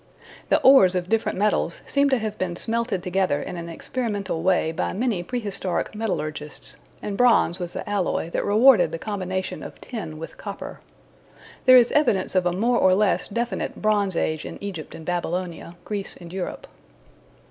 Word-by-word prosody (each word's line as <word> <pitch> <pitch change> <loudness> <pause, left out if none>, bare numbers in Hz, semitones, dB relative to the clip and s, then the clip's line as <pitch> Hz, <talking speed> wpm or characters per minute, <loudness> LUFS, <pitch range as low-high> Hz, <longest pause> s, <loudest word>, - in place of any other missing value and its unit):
The - - +4
ores 225 -9 +7
of 180 0 -2
different 225 -3 0
metals 200 -4 0
seem 280 0 +2
to 265 - +3
have 215 -2 -3
been 180 -2 -2
smelted 225 -2 -1
together 180 -5 +1
in - - -6
an 170 -1 -6
experimental 200 -2 -3
way 180 -3 +2
by 160 - -2
many 220 -3 0
prehistoric 200 -3 -2
metallurgists, 155 -9 -3 0.3
and 205 - -3
bronze 230 -7 +4
was 175 -1 -5
the - - -5
alloy 195 -4 -1
that - - -1
rewarded 220 +1 +5
the - - -3
combination 185 -1 -4
of - - -9
tin 195 -11 -6
with 165 - -8
copper. - - -7 0.9
There 255 0 +9
is 240 -1 +5
evidence 245 -11 +2
of 185 -1 +2
a - - +2
more 235 +7 +1
or 185 0 +5
less 205 -1 +1
definite 235 +3 -3
Bronze 205 -3 +1
Age 155 -2 -1
in - - -7
Egypt 190 -6 -6
and 160 - -10
Babylonia, 175 -1 -3
Greece 205 -2 -4
and 175 -1 -11
Europe. 190 -2 -5
190 Hz, 170 wpm, -24 LUFS, 175-220 Hz, 0.9 s, There